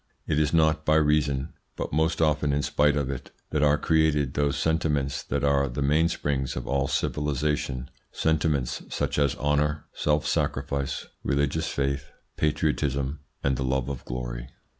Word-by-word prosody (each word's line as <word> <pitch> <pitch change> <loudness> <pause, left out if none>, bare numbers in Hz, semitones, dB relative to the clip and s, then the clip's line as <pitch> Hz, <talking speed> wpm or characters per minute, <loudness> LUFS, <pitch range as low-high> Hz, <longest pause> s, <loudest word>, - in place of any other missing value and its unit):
It 75 - +1
is 75 -1 +2
not 80 -1 +3
by 80 0 +3
reason, 75 -2 +2 0.2
but - - -4
most 80 +2 +2
often 75 -2 +2
in 70 0 +1
spite 75 0 +3
of 70 -2 0
it, 65 - -6 0.2
that 75 - +1
are 75 0 +4
created 75 -3 +2
those 70 -1 +1
sentiments 75 -3 0
that - - -2
are 70 -1 +3
the 65 +3 -2
mainsprings 75 -2 +1
of - - -4
all 70 +1 0
civilisation 75 -3 -1 0.2
sentiments 75 -5 0
such - - -1
as 70 -1 +2
honour, 75 +2 0
self 75 0 +1
sacrifice, 70 -1 -1 0.2
religious 70 +3 0
faith, 70 0 -2 0.2
patriotism, 75 -2 0 0.2
and 65 -2 +1
the 65 - -1
love 65 0 0
of 70 -3 -5
glory. - - -5
70 Hz, 155 wpm, -26 LUFS, 70-75 Hz, 0.2 s, are